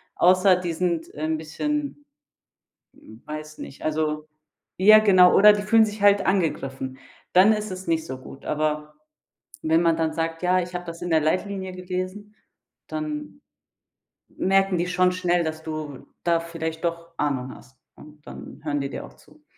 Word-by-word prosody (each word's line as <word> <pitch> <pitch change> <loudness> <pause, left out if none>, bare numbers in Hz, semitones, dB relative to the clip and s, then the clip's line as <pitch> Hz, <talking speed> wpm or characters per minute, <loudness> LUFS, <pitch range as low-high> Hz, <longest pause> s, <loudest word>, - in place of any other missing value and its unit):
außer 185 +1 +5
die 180 -2 -3
sind, 170 -1 -2
äh, 150 - -7
'n 160 0 0
bisschen 290 - -4 0.9
weiß 155 +7 -10
nicht, 135 - -10
also, 155 0 -2 0.5
ja, 215 +3 +8
genau, 185 -4 +6
oder 210 +1 +8
die 205 0 -2
fühlen 220 +2 +5
sich 210 -1 -7
halt 200 -1 +4
angegriffen. 135 -8 -1 0.4
Dann 190 +4 +6
ist 210 -1 -4
es 185 0 -7
nicht 160 -1 0
so 130 -4 -6
gut. 135 +1 -13
Aber 150 0 -2 0.7
wenn 160 +2 +2
man 165 -1 +3
dann 160 -1 0
sagt: 165 +1 -3
„Ja, 180 +1 +3
ich 180 0 -6
hab 175 0 -4
das 170 0 -8
in 175 - -3
der 160 -1 +4
Leitlinie 190 +3 -2
gelesen“, 185 +3 -6 0.5
dann 300 -2 -5 0.9
merken 195 -1 +1
die 175 - 0
schon 180 0 +2
schnell, 180 -2 +1
dass 160 0 -4
du 155 -3 -7 0.2
da 170 -1 +2
vielleicht 165 0 -5
doch 170 0 -3
Ahnung 130 -3 -2
hast. 130 +1 -18 0.2
Und 150 0 -16
dann - - -10
hören 145 -2 -1
die 140 0 -3
dir - - -6
auch - - -17
zu. - - -22
170 Hz, 170 wpm, -24 LUFS, 155-190 Hz, 0.9 s, ja